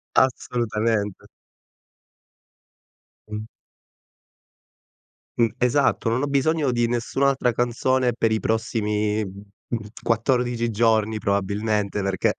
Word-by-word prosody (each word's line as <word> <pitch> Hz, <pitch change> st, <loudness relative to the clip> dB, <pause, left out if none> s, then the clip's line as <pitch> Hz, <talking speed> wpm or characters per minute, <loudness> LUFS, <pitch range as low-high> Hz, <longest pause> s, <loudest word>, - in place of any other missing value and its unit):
Assolutamente. 115 Hz, -5 st, 0 dB, 2.0 s
Mh. 105 Hz, 0 st, -5 dB, 1.9 s
Mh. 115 Hz, -1 st, +4 dB
Esatto. 125 Hz, -1 st, +2 dB
Non 120 Hz, +3 st, 0 dB
ho -, -, 0 dB
bisogno 140 Hz, 0 st, +1 dB
di 120 Hz, -1 st, +1 dB
nessun'altra 125 Hz, +2 st, +1 dB
canzone 125 Hz, +2 st, +1 dB
per 115 Hz, -1 st, +1 dB
i 110 Hz, -, +1 dB
prossimi, 110 Hz, -2 st, 0 dB
mhmm, 100 Hz, +3 st, -8 dB
14 120 Hz, 0 st, +1 dB
giorni 110 Hz, -1 st, +2 dB
probabilmente, 100 Hz, +1 st, 0 dB
perché 95 Hz, -1 st, +1 dB
115 Hz, 85 wpm, -23 LUFS, 105-125 Hz, 2.0 s, Mh